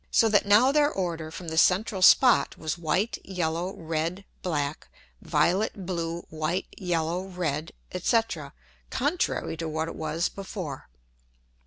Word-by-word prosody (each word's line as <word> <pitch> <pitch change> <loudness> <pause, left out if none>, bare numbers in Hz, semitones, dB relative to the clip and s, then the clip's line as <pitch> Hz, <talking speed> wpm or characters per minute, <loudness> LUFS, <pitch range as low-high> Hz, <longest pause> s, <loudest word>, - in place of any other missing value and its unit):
So 225 - +4
that 205 -1 +3
now 220 +6 +6
their 290 0 +4
order 170 - -3
from 165 +1 -7
the 160 0 +2
central 195 +2 +3
Spot 250 +6 +6
was 155 -1 -2
white, 180 +6 -1
yellow, 175 0 -2
red; 165 +4 -3 0.2
black; 150 -4 -2 0.3
violet, 195 +1 +1
blue, 170 -1 -3
white, 160 +4 -1
yellow, 175 0 -1
red, 165 -4 -3 0.2
&c. 205 +6 +3 0.7
contrary 290 - -1
to 165 0 -3
what 160 +1 -2
it - - -6
was 160 +2 -1
before. 185 - -7
175 Hz, 135 wpm, -27 LUFS, 160-195 Hz, 0.7 s, now